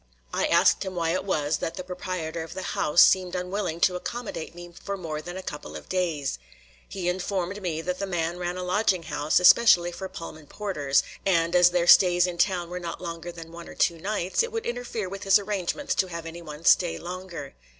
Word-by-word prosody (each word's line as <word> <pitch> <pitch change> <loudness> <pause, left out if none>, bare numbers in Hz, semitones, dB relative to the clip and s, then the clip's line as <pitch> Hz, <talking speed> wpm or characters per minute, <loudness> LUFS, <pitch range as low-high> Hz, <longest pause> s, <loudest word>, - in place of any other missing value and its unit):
I - - +1
asked - - +4
him 190 -1 -4
why 165 -1 0
it 185 - -1
was 150 -5 0
that 165 - -4
the 185 - -5
proprietor 180 -3 -4
of 160 +2 -8
the 190 - -5
house 150 +3 +5
seemed 185 -1 +3
unwilling 180 -2 -3
to 180 - +4
accommodate 200 -4 -5
me 175 0 -10
for 200 0 -3
more 155 -4 -5
than 175 +3 -7
a 190 - -6
couple 150 -4 -7
of - - -9
days. 165 - -1 0.5
He 185 -3 -4
informed 185 +2 -2
me 165 -4 -2
that 180 +2 -3
the 200 - -2
man 175 -1 -2
ran 175 0 -3
a 180 - -4
lodging 185 -1 +1
house 150 0 +1
especially 180 -2 +6
for 190 +2 -7
Pullman 160 -4 -9
porters, 150 -10 0 0.2
and, 170 -2 +2
as 180 0 +7
their 175 -1 +1
stays 175 0 +6
in 175 -1 -5
town 180 -3 +1
were 180 - -4
not 170 -1 -6
longer 170 0 -6
than 165 -1 -10
one 170 0 -10
or - - -11
two 170 -2 +1
nights, 190 0 0
it 470 0 -2
would 455 0 -4
interfere 240 -4 -3
with 195 +1 -7
his 195 -2 +5
arrangements 205 +6 -2
to 190 - +1
have 170 -2 -7
anyone 165 -1 -9
stay 175 -2 +4
longer. 175 -4 -7
180 Hz, 210 wpm, -26 LUFS, 165-190 Hz, 0.5 s, as